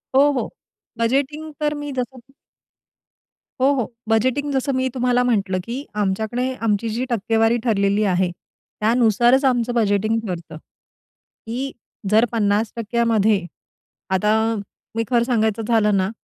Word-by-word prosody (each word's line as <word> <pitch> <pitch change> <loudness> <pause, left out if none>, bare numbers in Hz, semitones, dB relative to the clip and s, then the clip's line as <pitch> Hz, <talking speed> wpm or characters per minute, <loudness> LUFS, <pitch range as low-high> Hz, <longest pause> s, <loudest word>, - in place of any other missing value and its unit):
हो, 285 +2 +6
हो. 265 - -2 0.5
बजेटिंग 280 +6 -1
तर 300 0 0
मी 290 0 -5
जसं 255 -1 -4 1.4
हो, 275 +2 +5
हो. 250 -3 -2 0.2
बजेटिंग 260 +6 +1
जसं 270 +1 0
मी 260 0 +1
तुम्हाला 250 -1 +2
म्हटलं, 200 -6 +1
की 250 +7 -5 0.2
आमच्याकडे 220 +6 -1
आमची 215 +2 +1
जी 235 +4 -2
टक्केवारी 225 +1 +2
ठरलेली 200 -3 +2
आहे, 180 0 +1 0.5
त्यानुसारच 240 +3 +3
आमचं 245 -2 +1
बजेटिंग 215 0 +1
ठरतं. 170 -4 -6 0.9
की 255 +4 -3 0.4
जर 220 +2 +5
50% 225 +2 0
मध्ये 215 -4 +2 0.7
आता 210 +3 +2 0.6
मी 230 - +1
खरं 240 -2 +3
सांगायचं 225 -3 +1
झालं 210 -3 +3
ना, 190 +1 +1
230 Hz, 125 wpm, -21 LUFS, 210-255 Hz, 1.4 s, हो